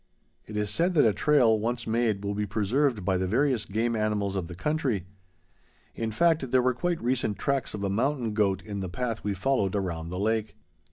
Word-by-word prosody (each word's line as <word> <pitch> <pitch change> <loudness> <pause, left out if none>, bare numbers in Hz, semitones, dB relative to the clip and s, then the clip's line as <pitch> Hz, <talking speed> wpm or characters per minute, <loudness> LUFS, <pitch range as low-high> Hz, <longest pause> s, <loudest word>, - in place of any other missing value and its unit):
It 105 - -6
is 105 -1 -1
said 175 +2 +1
that 150 - +5
a 110 - +4
trail, 125 -7 +4
once 120 +2 -2
made, 110 -3 0
will 100 - -1
be 105 0 -2
preserved 110 +2 0
by 95 -1 +2
the 95 0 -1
various 125 +2 +1
game 115 +3 0
animals 105 -2 0
of 90 -3 -2
the 90 - -8
country. 130 - -1 0.9
In 115 -1 -3
fact, 155 +3 +2
there 130 0 +3
were 130 0 +3
quite 175 +6 -1
recent 120 -4 0
tracks 140 -5 -1
of 100 - -5
a 100 - 0
mountain 120 +1 0
goat 100 -4 +1
in 100 -1 -5
the 95 -2 -4
path 115 +4 -3
we 105 -1 -1
followed 100 -2 0
around 85 -4 -3
the 90 - -5
lake. 110 +2 -1
110 Hz, 210 wpm, -27 LUFS, 100-130 Hz, 0.9 s, that